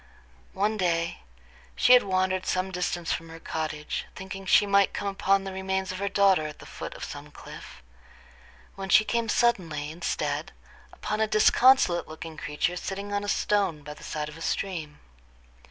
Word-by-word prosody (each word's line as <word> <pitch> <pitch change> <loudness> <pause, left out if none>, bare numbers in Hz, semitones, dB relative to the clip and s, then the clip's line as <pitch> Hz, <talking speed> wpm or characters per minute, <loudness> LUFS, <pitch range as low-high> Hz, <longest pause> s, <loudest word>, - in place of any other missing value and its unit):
One 210 +3 +1
day 170 -3 0 0.6
she 250 - +6
had 250 - +8
wandered 185 -1 0
some 185 +1 0
distance 175 -2 -1
from 165 0 -5
her 165 0 -10
cottage, 155 -2 -4
thinking 190 0 -8
she 205 - +6
might 200 -1 +3
come 205 - -3
upon 195 0 +2
the 195 -1 -6
remains 190 0 -2
of 185 - -6
her 200 0 -1
daughter 195 -5 +3
at 150 - -9
the - - -13
foot - - -7
of - - -8
some - - -7
cliff, - - -12 0.9
when 195 0 -7
she 215 - +6
came 235 0 -1
suddenly, 165 -12 +1
instead, 170 +2 -2 0.4
upon 215 +1 -3
a 220 - +3
disconsolate 215 -4 +4
looking 160 +1 -8
creature 150 +5 -2
sitting 200 +2 -5
on 205 0 0
a - - -5
stone 195 -10 +1
by 150 +1 -7
the - - -15
side 150 -1 -4
of 150 +1 -10
a - - -12
stream. 165 -6 -3
190 Hz, 175 wpm, -27 LUFS, 165-200 Hz, 0.9 s, had